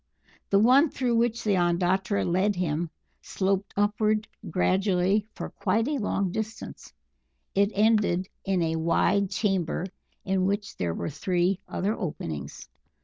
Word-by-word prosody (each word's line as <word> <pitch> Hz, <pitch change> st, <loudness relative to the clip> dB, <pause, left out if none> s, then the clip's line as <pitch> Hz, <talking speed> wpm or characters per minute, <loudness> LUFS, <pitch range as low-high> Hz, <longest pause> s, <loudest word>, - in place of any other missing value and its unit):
The 200 Hz, -, +4 dB
one 255 Hz, +9 st, +5 dB
through 245 Hz, -4 st, 0 dB
which 235 Hz, 0 st, +1 dB
the 205 Hz, -3 st, +2 dB
Ondatra 180 Hz, +3 st, +1 dB
led 190 Hz, +4 st, +1 dB
him 170 Hz, -2 st, -1 dB, 0.3 s
sloped 195 Hz, 0 st, -1 dB
upward 215 Hz, +1 st, +1 dB, 0.2 s
gradually 190 Hz, +3 st, +1 dB
for -, -, -6 dB
quite 225 Hz, +2 st, 0 dB
a 295 Hz, -2 st, -1 dB
long 200 Hz, -3 st, -1 dB
distance; 220 Hz, +2 st, -6 dB, 0.6 s
it 200 Hz, +1 st, +3 dB
ended 205 Hz, -4 st, +2 dB, 0.2 s
in 190 Hz, -3 st, +1 dB
a 160 Hz, 0 st, 0 dB
wide 175 Hz, +4 st, +2 dB
chamber 185 Hz, -4 st, -1 dB, 0.4 s
in 190 Hz, -1 st, +1 dB
which 200 Hz, 0 st, -2 dB
there 85 Hz, -2 st, -2 dB
were -, -, -3 dB
three 180 Hz, +4 st, 0 dB
other 200 Hz, +3 st, -1 dB
openings. 85 Hz, -, -5 dB
195 Hz, 135 wpm, -27 LUFS, 180-210 Hz, 0.6 s, one